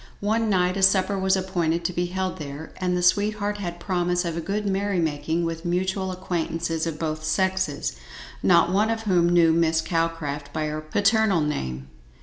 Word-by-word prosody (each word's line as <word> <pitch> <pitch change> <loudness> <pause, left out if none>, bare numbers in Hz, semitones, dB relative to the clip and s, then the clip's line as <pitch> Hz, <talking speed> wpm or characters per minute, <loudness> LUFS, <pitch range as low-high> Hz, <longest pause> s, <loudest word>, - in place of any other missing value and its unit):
One 220 +2 0
night 185 -1 +2
a - - -1
supper 190 +1 +4
was 190 0 +2
appointed 175 -3 -1
to 180 - 0
be 175 +1 -1
held 185 0 -3
there, 145 +1 -7
and 180 -1 0
the 180 - -1
sweetheart 205 +2 +1
had 175 -3 -5
promise 175 0 0
of 170 -1 -2
a 170 - -2
good 200 +5 -2
merry 200 0 0
making 160 +1 -1
with 165 0 -4
mutual 185 +2 -1
acquaintances 165 -2 -2
of 160 -2 -4
both 155 -1 -3
sexes, 190 +4 0 0.5
not 175 -1 +4
one 210 +4 +2
of 225 0 -2
whom 180 -5 +3
knew 170 -2 +5
Miss 165 -1 +2
Calcraft 160 -4 -2
by 155 +1 -2
her 155 0 -3
paternal 200 +3 +2
name. 65 - -3
175 Hz, 180 wpm, -24 LUFS, 160-190 Hz, 0.5 s, knew